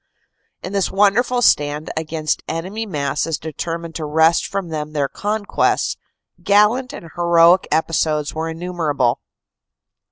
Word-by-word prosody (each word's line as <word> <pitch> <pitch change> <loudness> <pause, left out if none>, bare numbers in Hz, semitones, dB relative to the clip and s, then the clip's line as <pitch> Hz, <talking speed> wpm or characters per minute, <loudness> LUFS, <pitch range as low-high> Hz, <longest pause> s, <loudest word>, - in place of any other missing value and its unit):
In 185 - -6
this 195 -2 +1
wonderful 230 +5 +2
stand 150 -3 +2
against 155 -1 -2
enemy 195 +7 -4
masses 150 -1 -2
determined 165 +2 -5
to 160 - -4
wrest 160 +2 +3
from 195 -3 -4
them 155 -1 -5
their 145 -2 0
conquests, 205 +5 -1 0.5
gallant 210 +5 +3
and 165 - -10
heroic 170 +1 +4
episodes 155 -1 0
were 160 +1 -3
innumerable. 160 -7 -1
165 Hz, 120 wpm, -19 LUFS, 155-195 Hz, 0.5 s, heroic